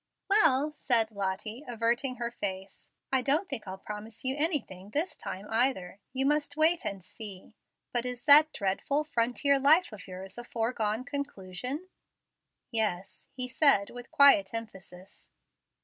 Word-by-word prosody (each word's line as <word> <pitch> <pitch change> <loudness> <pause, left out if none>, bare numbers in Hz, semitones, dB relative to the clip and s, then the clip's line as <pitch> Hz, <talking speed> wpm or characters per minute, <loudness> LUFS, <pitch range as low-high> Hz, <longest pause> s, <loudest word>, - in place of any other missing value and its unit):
"Well," 305 -8 +4
said 230 -6 +2
Lottie, 205 +5 -4
averting 240 +2 0
her 235 -1 -4
face, 195 -3 -6 0.2
"I 265 - +4
don't 295 +9 +1
think 220 - -6
I'll 190 0 -6
promise 210 +4 -8
you 260 +1 +1
anything 280 - -2
this 305 - -2
time 190 +2 -7
either. 220 -6 0
You 265 +1 -1
must 295 0 0
wait 325 +2 +3
and 195 -2 -4
see. 200 +1 -10 0.4
But 240 -1 0
is 245 -1 -6
that 300 +2 +8
dreadful 200 +10 -1
frontier 275 +1 +1
life 310 +5 +4
of 210 -2 -10
yours 190 +3 -8
a - - -7
foregone 225 -1 -2
conclusion?" 280 - -5 0.8
"Yes," 205 -5 -3
he 255 -1 -2
said, 255 -6 +3
with 245 0 -10
quiet 250 -8 +5
emphasis. 190 -4 -10
240 Hz, 145 wpm, -29 LUFS, 200-280 Hz, 0.8 s, that